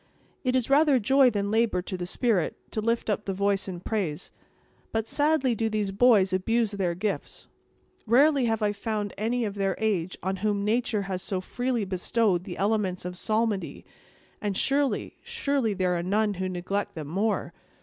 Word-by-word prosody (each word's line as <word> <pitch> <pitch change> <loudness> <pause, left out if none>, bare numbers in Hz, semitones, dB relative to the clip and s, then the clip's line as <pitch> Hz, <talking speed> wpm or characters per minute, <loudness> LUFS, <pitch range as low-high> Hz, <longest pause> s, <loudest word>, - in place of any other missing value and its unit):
"It 255 -1 +1
is 255 -3 +2
rather 285 0 +5
joy 265 +3 +5
than 205 -3 -2
labor 220 -5 +2
to 190 - -5
the 175 -1 -4
spirit, 200 -4 0
to 215 - -2
lift 230 +2 0
up 210 -1 -1
the 195 - -2
voice 200 0 +1
in 180 -2 -6
praise; 185 -8 -3 0.6
but 225 0 -1
sadly 290 -3 +2
do 225 0 -1
these 210 -2 -1
boys 200 -3 +4
abuse 225 +4 +1
their 185 -4 -1
gifts. 200 +3 -4 0.6
Rarely 275 +3 +5
have 225 -1 0
I 205 - +2
found 210 -1 -3
any 230 +3 -1
of 205 - -3
their 195 -1 -1
age, 190 -5 -1
on 190 +1 -1
whom 205 0 0
nature 220 -1 +1
has 190 -1 -3
so 190 0 -2
freely 245 +3 -2
bestowed 185 0 0
the 175 - -6
elements 200 -3 0
of 180 0 -4
psalmody; 215 +1 -1 0.6
and 205 -2 -1
surely, 280 0 0
surely, 280 - -1
there 180 -1 +1
are 170 - -1
none 205 +4 +1
who 185 0 -3
neglect 190 +3 -3
them 155 -2 -5
more. 200 +8 -1
210 Hz, 180 wpm, -27 LUFS, 190-230 Hz, 0.6 s, rather